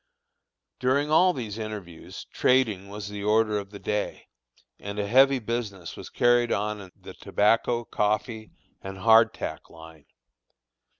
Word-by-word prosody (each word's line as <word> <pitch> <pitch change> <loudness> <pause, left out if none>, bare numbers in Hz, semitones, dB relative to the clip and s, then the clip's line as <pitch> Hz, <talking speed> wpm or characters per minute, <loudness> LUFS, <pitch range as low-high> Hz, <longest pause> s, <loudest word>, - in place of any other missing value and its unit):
] - - -58 0.3
During 140 +4 +1
all 180 +4 +5
these 115 - -6
interviews 105 -7 -8
trading 110 -7 +1
was 105 0 -7
the 105 -1 -6
order 105 0 +2
of 100 -1 -9
the 100 - -10
day, 105 +2 -4 0.5
and 100 0 -7
a 105 - -1
heavy 135 +4 +5
business 110 -7 -5
was - - -10
carried 120 0 +2
on 105 0 -2
in 95 - -11
the - - -11
tobacco, 115 +3 +1
coffee, 110 +1 -2 0.3
and 95 0 -8
hard 110 +3 +5
tack - - -7
line. 80 -2 -14
105 Hz, 145 wpm, -26 LUFS, 100-120 Hz, 0.5 s, all